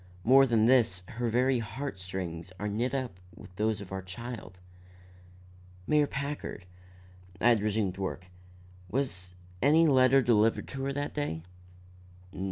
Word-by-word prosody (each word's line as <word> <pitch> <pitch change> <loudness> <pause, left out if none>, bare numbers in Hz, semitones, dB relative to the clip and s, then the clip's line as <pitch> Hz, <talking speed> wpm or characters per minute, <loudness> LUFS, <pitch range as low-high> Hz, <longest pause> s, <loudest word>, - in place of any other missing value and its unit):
More 135 +3 +6
than 115 -3 +3
this, 115 -7 +3
her 120 +1 -2
very 125 +2 +2
heart 115 0 -5
strings 90 -2 -5
are 105 - -2
knit 115 +6 -1
up 125 -9 -4 0.2
with 90 - -14
those 110 +1 0
of 95 - -10
our 95 0 -3
child." 95 0 -8 1.3
"Mayor 150 +4 +3
Packard," 140 -9 -5 0.7
I 120 - +4
had 115 -3 +4
resumed 105 -3 -1
work, 95 -1 -4 0.6
"was 95 -8 -3 0.3
any 155 +5 +5
letter 130 -2 +5
delivered 115 -1 +2
to 135 - -5
her 140 - -1
that 145 +1 -3
day?" 80 - -3
115 Hz, 140 wpm, -29 LUFS, 95-135 Hz, 1.3 s, More